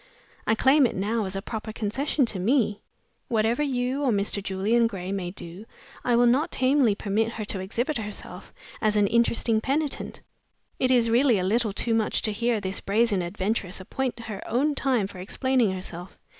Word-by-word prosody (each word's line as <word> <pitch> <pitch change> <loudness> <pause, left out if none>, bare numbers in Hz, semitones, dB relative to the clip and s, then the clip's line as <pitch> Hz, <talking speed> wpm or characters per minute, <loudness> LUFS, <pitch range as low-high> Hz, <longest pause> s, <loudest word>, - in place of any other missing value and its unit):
I 220 - +3
claim 265 +3 +5
it - - -6
now 210 +3 -1
as 190 0 -4
a 195 - -4
proper 220 -1 -5
concession 250 +7 0
to 215 -5 -4
Me. 210 0 +1 0.5
Whatever 225 +4 +1
you 260 -1 -1
or 270 -4 +2
Mr. 200 -1 0
Julian 205 +5 +1
Gray 190 -4 -5
may 190 -3 -2
do, 180 +3 -9 0.4
I 245 - +2
will 240 +1 +5
not 255 +6 +3
tamely 260 -4 +2
permit 220 +3 -1
her 215 - -4
to 200 - -3
exhibit 235 +9 -2
herself 210 -1 -8 0.3
as 215 -1 +2
an 205 -1 +4
interesting 230 0 +2
penitent. 285 +4 -2 0.6
It 255 - +2
is 240 -3 +3
really 245 -1 +4
a 185 - -1
little 220 +3 +1
too 225 +3 0
much 225 -1 +1
to 215 - +1
hear 230 +1 0
this 190 -1 -4
brazen 210 -1 +2
adventuress 190 +1 -2
appoint 240 +5 -3
her 215 -4 -6
own 275 +6 +1
time 260 -7 +1
for 190 -1 -9
explaining 245 +3 +1
herself. 185 -1 -7
225 Hz, 185 wpm, -26 LUFS, 200-245 Hz, 0.6 s, claim